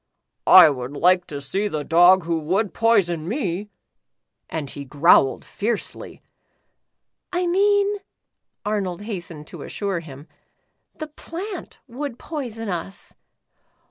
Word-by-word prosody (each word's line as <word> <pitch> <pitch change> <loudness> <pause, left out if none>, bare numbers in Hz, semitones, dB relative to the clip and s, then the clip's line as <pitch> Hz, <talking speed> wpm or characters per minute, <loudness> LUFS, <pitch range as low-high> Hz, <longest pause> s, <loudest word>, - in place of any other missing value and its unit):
" - - -57 0.2
I 155 - +6
would 130 0 -6
like 180 +4 +3
to 145 - -6
see 195 +9 -2
the 155 -6 -3
dog 175 +4 +5
who 165 0 -1
would 190 +7 -1
poi 230 -2 +4
son 170 -3 -4
me," 205 - -3 0.8
and 155 -3 -4
he 140 +1 -8
growled 140 0 +3
fiercely. 220 +1 -4 1.1
"I 360 0 0
mean," 405 +3 +2 0.7
Arnold 205 -3 -2
hastened 175 -8 -7
to - - -10
assure 200 -4 -3
him, 145 -2 -12 0.7
"the 310 - -5
plant 345 +5 -8
would 260 0 -6
poison 240 -9 -6
us. 185 +1 -6
190 Hz, 125 wpm, -22 LUFS, 165-235 Hz, 1.1 s, I